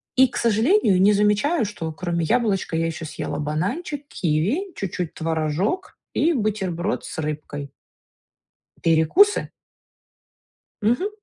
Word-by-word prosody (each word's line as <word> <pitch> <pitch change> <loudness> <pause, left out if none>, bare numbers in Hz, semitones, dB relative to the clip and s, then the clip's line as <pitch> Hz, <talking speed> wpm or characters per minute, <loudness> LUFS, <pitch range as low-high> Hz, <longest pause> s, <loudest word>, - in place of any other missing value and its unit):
И, 265 +1 +6
к - - -7
сожалению, 225 - +3
не 205 +2 +6
замечаю, 210 +9 +2
что 175 -6 -5
кроме 170 -1 -2
яблочка, 210 -5 +1
я 165 - +1
ещё 160 0 -5
съела 150 - -4
бананчик, 200 - -2
киви, 190 - 0
чуть-чуть 180 -3 -4
творожок 165 - -2 0.2
и 335 +2 +2
бутерброд 205 - -1
с - - -6
рыбкой. 150 -2 -5 1.1
Перекусы? 165 - +4 1.3
Мгм. 245 - +2
195 Hz, 110 wpm, -23 LUFS, 160-250 Hz, 1.3 s, И